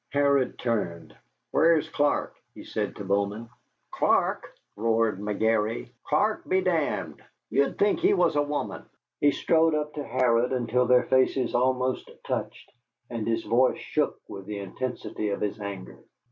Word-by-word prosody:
Harrod 140 -2 +2
turned. 105 -9 -3 0.4
"Where's 165 -1 +4
Clark?" 145 0 0 0.2
he - - -10
said - - -3
to - - -7
Bowman. 100 +3 -1 0.4
"Clark!" - - +1 0.2
roared 115 -2 +1
McGary, 110 +2 0 0.2
"Clark 210 +9 0
be 185 - +3
d 185 -1 +1
d. 160 -4 -1 0.4
Ye'd 140 0 +1
think 205 +9 +2
he 380 +3 +3
was - - +2
a 145 - +3
woman." 145 0 -3 0.4
He 145 - +5
strode 160 +2 +2
up 150 0 -2
to 150 - -4
Harrod 125 -1 +2
until 125 0 +1
their 125 0 +5
faces 130 -1 +2
almost 130 +1 0 0.2
touched, - - -4 0.4
and 115 -3 -3
his 115 0 0
voice 125 +2 +3
shook - - -1
with 100 -1 -9
the 105 -1 -4
intensity 105 +2 -4
of 100 - -2
his 105 +1 -2
anger. 100 -2 -7
125 Hz, 150 wpm, -27 LUFS, 110-145 Hz, 0.4 s, He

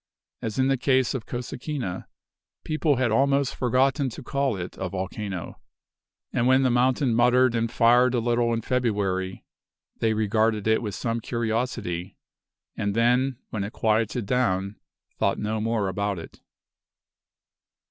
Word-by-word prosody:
As 110 -2 -4
in 130 0 +3
the 135 0 +2
case 130 -1 +2
of 130 -5 -5
Cosequina, 125 - -5 0.6
people 155 -1 +1
had 125 -2 +1
almost 140 +3 +2
forgotten 130 +2 +2
to 130 +5 -9
call 135 -3 -1
it 90 -1 -6
a 95 - -2
volcano. 95 -1 -5 0.7
And 120 - +1
when 130 +1 +5
the 130 - +3
mountain 125 +1 +2
muttered 125 +1 +4
and 115 -1 0
fired 120 +2 +4
a - - +2
little 120 0 +1
in 115 -1 -1
February, 100 -7 -1 0.5
they 110 -1 +1
regarded 110 0 +1
it 110 0 +3
with 105 -4 -4
some 115 -1 -2
curiosity, 110 -6 -3 0.6
and 100 0 -2
then, 125 +3 +2
when 105 -3 -2
it 100 - -6
quieted 110 +1 0
down, 100 -4 0 0.4
thought - - +1
no 105 +1 -2
more 110 -2 0
about 100 +1 -2
it. 80 - -10
115 Hz, 145 wpm, -25 LUFS, 105-125 Hz, 0.7 s, when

